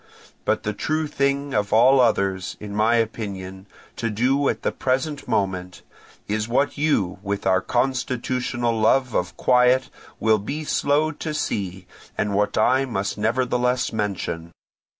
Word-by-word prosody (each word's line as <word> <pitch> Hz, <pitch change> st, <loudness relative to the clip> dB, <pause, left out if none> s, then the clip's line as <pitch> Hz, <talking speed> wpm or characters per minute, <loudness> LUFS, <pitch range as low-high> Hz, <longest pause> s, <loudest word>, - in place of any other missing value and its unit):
But -, -, +1 dB
the 105 Hz, -, -2 dB
true 155 Hz, +8 st, -1 dB
thing 140 Hz, -1 st, -1 dB
of 105 Hz, -1 st, 0 dB
all 130 Hz, +5 st, +6 dB
others, 95 Hz, -6 st, +1 dB
in 105 Hz, -1 st, -7 dB
my 110 Hz, +3 st, +3 dB
opinion, 100 Hz, -4 st, -3 dB, 0.3 s
to 115 Hz, -, -1 dB
do 130 Hz, +6 st, +1 dB
at -, -, -3 dB
the -, -, +1 dB
present 135 Hz, +3 st, -2 dB
moment, 95 Hz, -2 st, -2 dB, 0.4 s
is 105 Hz, +1 st, -1 dB
what 135 Hz, +4 st, +1 dB
you, 140 Hz, -, 0 dB
with 100 Hz, 0 st, -3 dB
your 95 Hz, 0 st, +3 dB
constitutional 125 Hz, -1 st, -1 dB
love 125 Hz, +2 st, +3 dB
of 90 Hz, 0 st, -2 dB
quiet, 125 Hz, +1 st, +3 dB, 0.3 s
will 110 Hz, -1 st, +3 dB
be 140 Hz, +10 st, -4 dB
slow 150 Hz, +1 st, +1 dB
to 155 Hz, +1 st, -5 dB
see, 95 Hz, -8 st, -3 dB, 0.3 s
and 100 Hz, -1 st, 0 dB
what 105 Hz, +1 st, +1 dB
I 130 Hz, +5 st, +3 dB
must 100 Hz, -6 st, -3 dB
nevertheless 125 Hz, +2 st, 0 dB
mention. 95 Hz, -5 st, -3 dB
115 Hz, 145 wpm, -23 LUFS, 100-130 Hz, 0.4 s, all